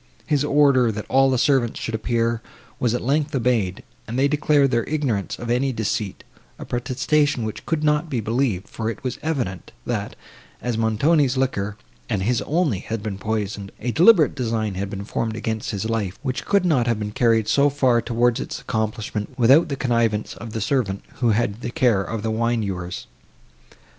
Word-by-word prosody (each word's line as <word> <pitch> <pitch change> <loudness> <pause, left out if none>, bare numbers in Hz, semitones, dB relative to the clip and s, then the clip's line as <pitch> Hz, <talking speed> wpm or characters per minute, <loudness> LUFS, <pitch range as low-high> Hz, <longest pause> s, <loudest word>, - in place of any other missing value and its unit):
His 150 -2 +1
order, 140 -5 +4
that 105 0 -5
all 135 +1 +4
the 130 - +2
servants 130 -2 +2
should 115 - -4
appear, 115 +1 0 0.4
was 120 -2 +1
at - - -3
length 145 +3 0
obeyed, 115 -7 0 0.2
and 115 +3 -4
they 135 +2 +4
declared 145 -1 +3
their 120 -2 +2
ignorance 135 -10 -1
of 120 -1 -4
any 130 +3 +1
deceit—a 110 -3 -5
protestation 130 +2 0
which 110 - -6
could 160 -2 0
not 150 +2 +2
be 130 - -1
believed; 110 -3 -1
for 110 -1 -3
it 115 - -7
was 125 -2 -3
evident, 125 - -3
that, - - -3 0.4
as 120 -2 -2
Montoni's 130 +5 +2
liquor, 105 -6 -1 0.3
and 100 -5 0
his 120 +3 +1
only, 150 - +1
had 110 +1 -5
been 100 -3 -4
poisoned, 105 -2 -3
a 120 +2 -2
deliberate 175 - +6
design 115 -5 -1
had 95 +1 -3
been 100 0 -6
formed 110 +1 -2
against 110 -1 -3
his 105 +1 -2
life, 105 -4 -2
which 130 -3 -3
could 200 -2 +2
not 135 -9 +2
have 115 -2 +1
been 105 -1 -4
carried 115 -1 +2
so 140 +1 +4
far 130 -4 +2
towards 120 0 +1
its - - -5
accomplishment, 110 -1 -3
without 135 +7 +5
the 140 - -1
connivance 115 -5 0
of 115 -2 -9
the 110 - -3
servant, 105 -4 0
who 120 - +2
had 110 0 0
the - - -3
care 120 -7 +2
of 110 +2 -4
the 110 - -1
wine 115 0 0
ewers. 90 -2 -4
115 Hz, 185 wpm, -22 LUFS, 110-135 Hz, 0.4 s, deliberate